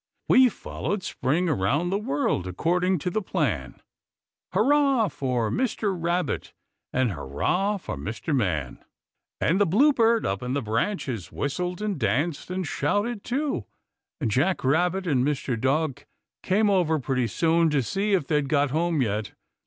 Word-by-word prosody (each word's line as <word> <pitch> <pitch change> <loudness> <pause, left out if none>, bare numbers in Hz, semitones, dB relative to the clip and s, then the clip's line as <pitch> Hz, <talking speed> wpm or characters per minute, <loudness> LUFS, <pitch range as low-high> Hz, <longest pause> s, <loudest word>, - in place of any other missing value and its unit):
"We've 255 -2 +6
followed 200 -1 -4
Spring 165 +1 0
around 145 - +1
the 200 - +1
world, 140 - -1
According 180 - +1
to 180 - 0
the 215 - 0
plan! - - -2 0.7
Hurrah 275 -6 +3
for 125 -7 -1
Mr. 220 -5 0
Rabbit! 175 +1 -2 0.4
And 130 -4 +1
hurrah 100 - -1
for 170 - -6
Mr. 110 - -3
Man!" 80 - -1 0.6
And 180 +6 +2
the 205 - +4
bluebird 230 - +4
up 95 0 -1
in 125 +1 -3
the 140 - 0
branches 115 - -2
whistled 180 +7 -3
and 205 -7 -2
danced 145 +8 0
and 185 0 -2
shouted, 205 - -1
too; 275 +4 -2 0.5
and 120 -8 -1
Jack 150 - +1
Rabbit 175 +7 +1
and 135 -7 +2
Mr. 140 -3 -1
Dog 135 +4 -1 0.4
came 205 +2 +2
over 175 -5 +2
pretty 130 -3 -1
soon 165 - +2
to 145 -3 +1
see 200 - -1
if 180 -7 +2
they'd 150 -2 0
got 145 -2 +2
home 160 -1 +1
yet. 105 -1 -2
160 Hz, 150 wpm, -25 LUFS, 130-195 Hz, 0.7 s, We've